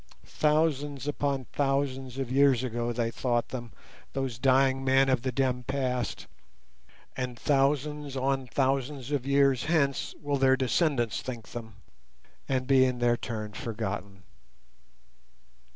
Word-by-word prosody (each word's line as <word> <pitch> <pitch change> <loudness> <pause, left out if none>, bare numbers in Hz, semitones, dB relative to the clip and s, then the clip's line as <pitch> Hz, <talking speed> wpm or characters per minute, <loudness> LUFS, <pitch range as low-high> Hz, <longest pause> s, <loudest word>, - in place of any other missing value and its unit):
—thousands 145 -3 0
upon 140 -2 -1
thousands 135 -2 -1
of 135 -2 -3
years 135 -2 +4
ago 120 -1 -2
they 115 -1 -1
thought 120 -1 -1
them, 120 -3 -6 0.4
those 130 -4 -3
dying 135 0 +3
men 135 0 +4
of 130 -2 +2
the 130 +1 -1
dim 125 -1 0
past; 125 -3 -2 0.9
and 125 -2 -4
thousands 145 +1 0
on 135 0 0
thousands 135 +2 -1
of 140 -3 -1
years 140 -2 +3
hence 145 -4 +1
will 145 -1 -1
their 135 0 +4
descendants 130 - +1
think 120 -4 -7
them 110 -3 -8 0.7
and 130 -1 0
be 135 -1 +5
in 130 -1 +1
their 120 0 +3
turn 110 -3 -5
forgotten. 100 -4 -5
130 Hz, 130 wpm, -28 LUFS, 120-140 Hz, 0.9 s, be